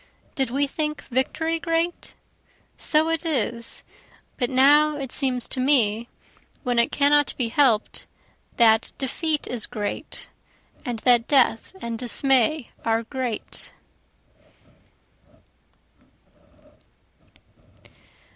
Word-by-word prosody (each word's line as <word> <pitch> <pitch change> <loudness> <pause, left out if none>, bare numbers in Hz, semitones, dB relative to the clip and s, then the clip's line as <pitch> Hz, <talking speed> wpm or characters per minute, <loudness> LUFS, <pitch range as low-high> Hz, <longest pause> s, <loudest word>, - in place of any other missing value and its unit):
Did 265 -3 -1
we 275 +4 +1
think 300 +1 -3
victory 320 +6 -1
great? 330 +1 -2 0.6
So 310 +1 +1
it 330 0 -1
is 240 -7 -3 0.5
but 245 -2 -1
now 290 +3 +4
it 270 -3 -6
seems 255 -3 -1
to - - -3
me, 235 -4 +2 0.5
when 245 -3 +1
it 235 - +2
cannot 290 0 +3
be 240 -3 -1
help'd, 235 -4 +1 0.5
that 225 -1 +4
defeat 300 +3 -1
is 240 -3 0
great, 205 -1 -6 0.6
And 245 -2 -4
that 240 -2 +4
death 265 +2 +2
and 230 -1 -4
dismay 260 +2 +1
are 225 0 0
great. 250 -2 -5
260 Hz, 100 wpm, -23 LUFS, 235-295 Hz, 0.6 s, now